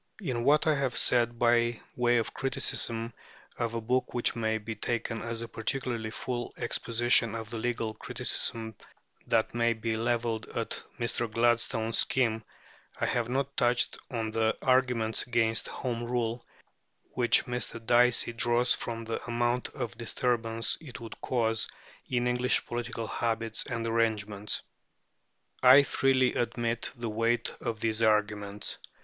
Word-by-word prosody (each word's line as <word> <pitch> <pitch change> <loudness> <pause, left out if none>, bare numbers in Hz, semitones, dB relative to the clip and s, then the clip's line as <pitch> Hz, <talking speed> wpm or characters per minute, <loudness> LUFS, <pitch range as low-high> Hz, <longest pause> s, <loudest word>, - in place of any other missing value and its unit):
In 130 - -2
what 150 +1 +4
I 155 - +4
have 135 -3 -1
said 120 -1 +3
by 120 -1 +3 0.2
way 120 0 +3
of 115 - -1
criticism 115 -3 -1 0.5
of 115 -1 -1
a 115 - -2
book 125 +3 0
which 120 - +1
may 110 -1 0
be 110 +1 -5
taken 115 0 -3
as 115 0 -4
a - - -5
particularly 115 -1 -2
full 120 +1 -4
exposition 115 0 +1
of 110 0 -6
the 115 - -3
legal 115 -2 -2
criticism 115 -1 -1 0.5
that 115 -1 +2
may 115 0 +2
be 110 0 -2
levelled 115 -1 -1
at - - -3 0.2
Mr. 120 -1 -1
Gladstone's 115 -1 +1
scheme, 115 -4 +2 0.6
I - - +1
have 120 -1 0
not 135 +2 -1
touched 120 -1 +1
on 115 -3 -2
the 110 0 +1
arguments 125 -4 +2
against 115 -2 +1
Home 120 -2 -3
Rule 120 -1 -1 0.7
which 120 -2 +4
Mr. 125 -1 -3
Dicey 120 0 +4
draws 120 +1 +2
from 115 -1 -4
the 115 - -3
amount 120 +1 0
of 120 -5 -5
disturbance 115 -1 0
it 140 -6 -9
would 115 -1 -9
cause 115 -3 +1 0.4
in 125 -1 +1
English 125 0 +1
political 120 -1 -4
habits 115 0 -2
and 115 -1 -3
arrangements. 110 -3 0 1.0
I 130 +3 +9
freely 130 -1 +2
admit 120 0 -1
the 120 -2 -4
weight 115 +1 0
of 115 -3 -3
these 110 0 0
arguments. 105 -2 0
115 Hz, 145 wpm, -29 LUFS, 115-120 Hz, 1.0 s, I